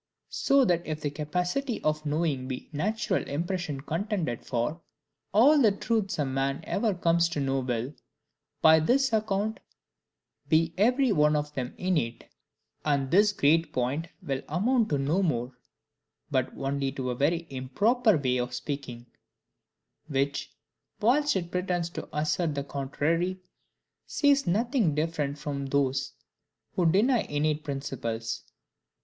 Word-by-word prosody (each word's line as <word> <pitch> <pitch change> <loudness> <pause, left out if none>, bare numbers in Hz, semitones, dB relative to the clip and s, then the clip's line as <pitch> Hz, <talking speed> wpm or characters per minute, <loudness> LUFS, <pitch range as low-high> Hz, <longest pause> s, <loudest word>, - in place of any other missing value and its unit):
So 275 -1 +3
that 175 -5 +2
if 155 0 -3
the 145 -2 -2
capacity 180 - -2
of 155 0 0
knowing 145 -4 0
be 130 -1 -6
the 150 - -7
natural 215 +8 0
impression 165 -1 -3
contended 165 - -2
for, 125 +7 -2 0.5
all 280 +8 +6
the 220 -4 +6
truths 205 0 -1
a 150 - +1
man 135 +1 -1
ever 210 -1 0
comes 170 -1 +2
to 160 - -3
know 135 -1 0
will, 125 +1 -2 0.7
by 160 0 +8
this 255 - +2
account, 215 0 0 0.9
be 165 0 +3
every 250 +5 +3
one 150 -4 +4
of 150 0 -2
them 130 -2 -4
innate; 155 -11 -1 0.6
and 140 -3 0
this 205 +3 +5
great 165 -3 +2
point 135 +6 -1 0.2
will 135 -5 -2
amount 220 - +2
to 145 - +1
no 145 +8 +1
more, 125 -8 0 0.8
but - - +1
only 135 0 -1
to 130 -2 -3
a - - -3
very 165 +6 +1
improper 205 - +2
way 130 -3 0
of 125 0 -2
speaking; 125 -2 -5 1.0
which, 140 -1 -1 0.5
whilst 280 +6 +3
it 175 -2 -2
pretends 180 -2 -1
to - - -7
assert 150 +1 0
the 140 - -2
contrary, 155 +7 -1 0.7
says 285 -1 +2
nothing 215 - +1
different 150 -2 -1
from 140 -1 -4
those 140 0 0 0.6
who 170 -3 +3
deny 230 +7 +3
innate 150 +1 -1
principles. 115 -6 -4
155 Hz, 140 wpm, -28 LUFS, 140-195 Hz, 1.0 s, by